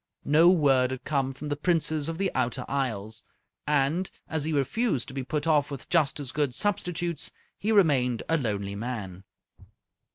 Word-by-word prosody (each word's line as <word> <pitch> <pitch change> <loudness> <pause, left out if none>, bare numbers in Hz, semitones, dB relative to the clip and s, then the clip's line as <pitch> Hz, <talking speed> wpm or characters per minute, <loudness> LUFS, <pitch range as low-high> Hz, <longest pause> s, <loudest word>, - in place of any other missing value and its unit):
No 160 +4 +6
word 135 -8 +4
had 130 -1 -5
come 135 -3 0
from 140 +3 -7
the 145 - 0
Princess 155 -1 +1
of 165 0 -3
the 195 0 0
Outer 125 0 -1
Isles, 110 -5 -2 0.5
and, 150 +5 +1 0.2
as 160 -2 -2
he 160 - -1
refused 145 - 0
to - - -8
be 135 - -3
put 145 +3 -2
off 150 -3 +3
with 140 -3 -8
just 155 -4 +2
as 135 -3 -4
good 145 -5 0
substitutes, 175 -5 -1 0.3
he 215 - -1
remained 135 - +3
a 165 - +2
lonely 100 -8 -2
man. 100 -4 -5
145 Hz, 170 wpm, -27 LUFS, 125-160 Hz, 0.5 s, No